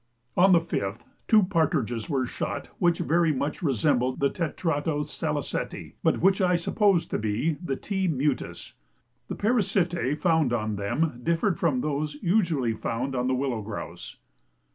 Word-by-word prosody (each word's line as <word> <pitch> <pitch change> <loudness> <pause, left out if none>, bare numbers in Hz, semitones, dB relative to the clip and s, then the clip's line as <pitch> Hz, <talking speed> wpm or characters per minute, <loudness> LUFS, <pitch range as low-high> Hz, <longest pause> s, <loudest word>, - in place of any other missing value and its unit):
On 190 +2 +5
the 175 - +7
5th 115 -11 -3 0.3
two 215 -2 +6
partridges 155 - 0
were 135 -4 +1
shot - - -4
which 175 -1 +3
very 170 -1 +2
much 145 +4 -2
resembled 130 - +1
the 140 0 +2
tetrao 160 -3 -1
saliceti, - - -4
but - - +1
which 195 +3 +4
I 180 -1 +3
suppose 185 +1 +2
to - - -3
be 110 +9 0
the 135 -6 -1
T. 190 +4 -2
mutus. 145 -3 -2 0.5
The - - -4
parasitæ 180 - +1
found 160 -5 +2
on 110 -2 -1
them 120 +7 -1
differed 170 - +1
from 145 -7 +1
those 150 +1 -2
usually 165 - +1
found 120 +4 -3
on 125 0 0
the 130 - +2
willow 130 -4 -1
grouse. 105 0 -7
150 Hz, 150 wpm, -26 LUFS, 130-175 Hz, 0.5 s, the